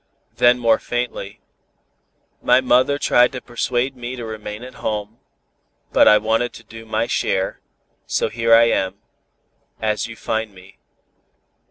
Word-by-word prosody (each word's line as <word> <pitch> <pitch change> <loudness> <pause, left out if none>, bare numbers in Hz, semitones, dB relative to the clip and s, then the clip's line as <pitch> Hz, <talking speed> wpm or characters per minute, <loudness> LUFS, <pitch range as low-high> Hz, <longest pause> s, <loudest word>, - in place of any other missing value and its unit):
Then 120 0 +5
more 115 -2 +3
faintly 120 -5 -4 1.0
"My 125 +1 +4
mother 130 +2 +3
tried 125 -3 +3
to 125 - -4
persuade 120 +2 -2
me 125 0 -6
to 120 -2 -7
remain 110 0 -7
at 130 - -10
home, 105 +1 -4 0.7
but - - +6
I 105 - +8
wanted 115 +3 0
to 115 - -12
do 115 +1 -12
my 110 - 0
share, 95 -4 -1 0.5
so - - 0
here 115 0 -1
I 115 +1 +8
am 95 -5 +1 0.8
as 110 0 -1
you 115 - -9
find 110 -2 -3
me. 95 +1 -17
115 Hz, 145 wpm, -20 LUFS, 110-120 Hz, 1.0 s, I